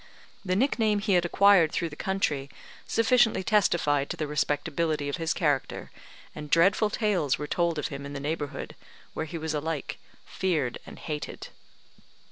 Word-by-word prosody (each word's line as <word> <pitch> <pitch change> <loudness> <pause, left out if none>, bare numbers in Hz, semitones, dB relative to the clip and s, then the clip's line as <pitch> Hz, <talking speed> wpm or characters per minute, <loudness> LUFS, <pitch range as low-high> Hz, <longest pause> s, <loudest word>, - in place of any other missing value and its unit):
The 185 -2 0
nickname 220 -2 +2
he 205 0 0
had 175 -1 +3
acquired 185 -3 +5
through 170 -2 -1
the 145 - -10
country 150 -7 -1 0.4
sufficiently 230 -4 +3
testified 170 -9 +2
to - - -4
the 155 - -2
respectability 150 +1 -1
of 145 - -3
his 165 0 -1
character, 145 -5 -1 0.4
and 150 -1 -8
dreadful 195 +6 +4
tales 205 - +1
were 150 - -4
told 170 +1 0
of 150 - -2
him 140 -1 -6
in 140 0 -7
the 140 - -4
neighbourhood, 145 0 -4 0.4
where 160 - -3
he 170 - -5
was 160 0 -3
alike 150 -1 -3 0.3
feared 160 -10 -1
and - - -10
hated. 150 -2 -6
160 Hz, 160 wpm, -27 LUFS, 145-190 Hz, 0.4 s, acquired